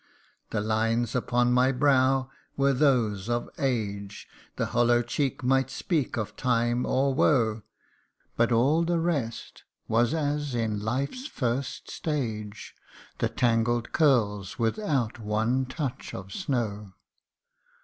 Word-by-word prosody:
The 105 - -1
lines 115 +2 0
upon 125 0 +1
my 125 +1 +4
brow 130 -1 +2 0.3
were 140 0 +3
those 120 -7 +2
of 120 0 -1
age; 105 -7 -2 0.3
The - - -1
hollow 120 0 +3
cheek 130 +2 -2
might 135 +1 +2
speak 150 -2 -1
of 110 -2 -3
time 120 -1 +1
or 135 +1 +2
woe; 115 -6 +2 0.7
But 120 +1 +2
all 135 +8 +3
the 170 0 +1
rest 145 -9 -3 0.2
was 120 +6 +2
as 145 -3 -1
in 110 -3 -1
life's 135 - -2
first 130 - -3
stage 110 -9 -4 0.5
The - - +1
tangled 120 0 +1
curls 105 - +2
without 120 - -1
one 110 +5 0
touch 130 -1 -5
of 95 +1 -8
snow. 110 - -3
120 Hz, 120 wpm, -27 LUFS, 115-135 Hz, 0.7 s, my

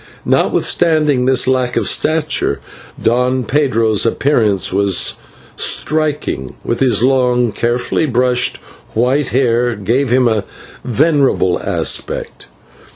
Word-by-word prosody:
Notwithstanding 150 -6 +1
this 130 -1 +2
lack 130 -1 0
of - - 0
stature, 155 - 0 0.4
Don 125 +2 +1
Pedro's 115 -7 +1
appearance 115 -7 0
was 100 -1 +2 0.4
striking, 150 - -1
while 120 - -1
his 120 -4 +1
long, 125 -2 +2
carefully 120 +7 -1
brushed 125 -1 +1 0.4
white 130 +5 +1
hair 120 -1 +1
gave 115 +7 -1
him 125 0 +3
a 110 -3 0 0.4
venerable 135 - +1
aspect. - - -2
125 Hz, 100 wpm, -15 LUFS, 115-135 Hz, 0.4 s, him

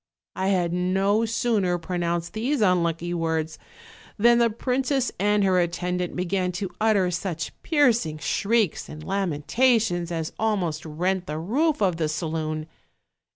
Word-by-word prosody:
I 190 - -1
had 180 -3 +1
no 195 +5 +1
sooner 220 -6 +1
pronounced 170 -1 -2
these 250 +6 -1
unlucky 175 -3 +1
words 160 -2 -2 0.6
than 235 +2 +5
the 235 -1 +4
princess 255 +3 0
and 205 +1 +2
her 185 -2 +3
attendant 180 +1 -2
began 180 0 -1
to 185 0 -4
utter 205 -5 +3
such 175 -2 -3
piercing 240 - +2
shrieks 210 +3 0
and 155 0 -9
lamentations 195 - +1
as 160 -2 -3
almost 180 -8 -1
rent 180 +4 -1
the 150 - -3
roof 275 - +1
of 180 -4 +1
the 160 -2 0
saloon. 155 0 -3
180 Hz, 135 wpm, -25 LUFS, 170-220 Hz, 0.6 s, than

